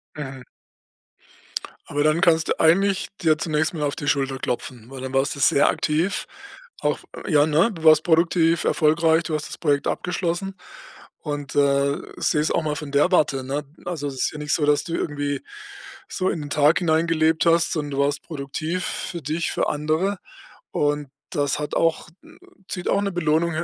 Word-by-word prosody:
Mhm. 135 -3 -7 1.4
Aber 145 +1 0
dann 155 +2 +2
kannst 165 -2 +3
du - - -1
eigentlich 195 +4 +3
dir 155 -2 +3
zunächst 155 0 0
mal 155 -2 -3
auf 145 - -1
die 145 - -6
Schulter 135 -2 +1
klopfen, 120 -1 -4
weil 135 -1 -8
dann 130 0 -5
warst 135 +3 +1
du 140 - -9
sehr 140 - +4
aktiv 165 +6 0 0.5
auch, - - 0 0.3
ja, 150 -4 +4
ne? 160 +9 +3
Du 165 -2 -10
warst 155 0 +7
produktiv, 165 0 +3
erfolgreich, 160 +1 +3
du 160 - -2
hast 150 - -3
das - - -8
Projekt 145 -3 +1
abgeschlossen 180 +2 -2 0.6
und, 145 -2 -5
äh, 140 0 +3 0.2
seh 150 - +1
es 155 - +1
auch 170 - +1
mal 150 -1 -1
von 150 -1 -6
der 145 +6 +3
Warte, 135 -6 +2
ne? 140 +2 -3 0.2
Also, 160 -5 -3
es 135 - -5
ist - - 0
ja 150 - -7
nicht 150 -1 -1
so, 150 - +2
dass 145 0 +3
du 170 -3 -6
irgendwie 145 -2 -2 0.7
so 185 - -1
in 165 - -2
den 145 - -7
Tag 150 +2 +4
hineingelebt 160 -1 +2
hast, 170 0 +3
sondern 150 -3 -3
du 140 - -3
warst 145 +1 -1
produktiv 160 +3 -4
für 175 -3 -4
dich, 155 +4 -2
für - - 0
andere 155 +6 0 0.5
und 145 -1 0 0.2
das 145 -2 0
hat 150 - -4
auch 165 +1 +1 0.6
zieht 180 -2 -4
auch - - +2
'ne 200 -1 -1
Belohnung 165 -1 +1
155 Hz, 185 wpm, -23 LUFS, 145-170 Hz, 1.4 s, warst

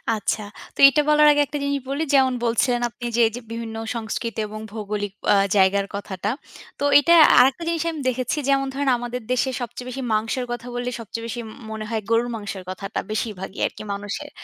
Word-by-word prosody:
আচ্ছা। 215 +1 -1 0.3
তো - - -19
এটা 300 +2 +2
বলার 300 0 +6
আগে 290 - +3
একটা 295 - -4
জিনিস 280 0 0
বলি। 280 +3 -1
যেমন 265 -2 +4
বলছিলেন 240 +1 +1
আপনি 240 +1 -9
যে, 240 - +3
এইযে 230 +3 -6
বিভিন্ন 230 -1 -5 0.2
সংস্কৃতি 230 0 -4
এবং 215 +1 -7
ভৌগোলিক 210 -2 -4 0.2
আ - - +5 0.2
জায়গার 195 +1 +3
কথাটা। 200 -1 -4 0.5
তো - - -3 0.2
এটা 335 +4 +4 0.3
আরেকটা 265 +6 +4
জিনিস 335 -1 0
আমি 315 -3 -6
দেখেছি 255 +3 -2
যেমন 275 0 +2
ধরেন 275 0 0
আমাদের 245 +1 -5
দেশে 255 +1 +1
সবচেয়ে 245 +1 -6
বেশি 260 +2 -5
মাংসের 225 +4 0
কথা 240 0 -5
বললে 245 0 -2
সবচেয়ে 230 +1 -6
বেশি 240 +1 -4 0.3
মনে 220 0 -5
হয় 225 -1 -1
গরুর 230 +1 +2
মাংসের 205 -3 -6
কথাটা 195 +2 -4
বেশিরভাগই 205 -3 -4
আরকি - - -10
মানুষের। 205 +9 -5
235 Hz, 185 wpm, -23 LUFS, 215-265 Hz, 0.5 s, বলার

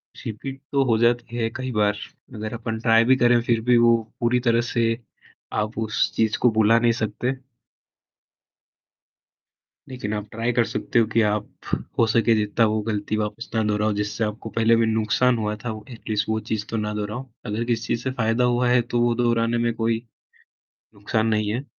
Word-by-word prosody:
Repeat 135 +5 -7
तो 140 -1 +3
हो 115 -3 +2
जाती 120 0 +1
है 115 -1 0
कई 130 0 -4
बार। 105 -1 +1 0.4
अगर 110 +1 -5
अपन 115 -1 -4
ट्राई 115 -1 +5
भी 130 +1 +5
करे 120 -1 +4
फिर 115 -1 +1
भी 125 -1 +5
वो 115 0 +5 0.2
पूरी 120 +1 +2
तरह 115 0 +4
से 115 - +1 0.8
आप 110 +2 -4
उस 110 +1 0
चीज़ 110 -1 +1
को 125 - +5
भुला 110 +1 +4
नहीं 120 0 +3
सकते। 120 +4 -2 2.5
लेकिन 125 -5 -4
आप 105 0 -4
ट्राई 115 +2 -1
कर 120 -1 +3
सकते 115 - -1
हो 115 - +4
कि 115 - +4
आप 105 0 -2 0.5
हो 115 - +6
सके 115 0 +4
जितना 105 +2 +2
वो 110 0 0
गलती 105 0 -1
वापस 110 +2 -4
ना 110 - +2
दोहराओ, 105 0 +1
जिससे 105 +2 -2
आपको 110 +1 -4
पहले 115 +1 +4
भी 115 - +3
नुकसान 110 +3 +2
हुआ 105 -1 -2
था। - - -1 0.2
एटलीस्ट 110 -2 -3
वो 110 0 +1
चीज़ 105 -2 -1
तो 115 - -2
ना 105 0 -2
दोहराओ। 105 +5 -5 0.2
अगर 110 +1 -2
किसी 115 -1 -1
चीज़ 115 - -1
से 130 - -1
फ़ायदा 120 -1 0
हुआ 125 0 +2
है, 125 0 +4
तो 120 0 -1
वो 120 0 +3
दोहराने 115 -1 +1
में 115 - 0
कोई 115 0 0 1.0
नुकसान 110 +2 -1
नहीं 110 -2 +1
है। 125 +4 -3
115 Hz, 190 wpm, -23 LUFS, 110-120 Hz, 2.5 s, हो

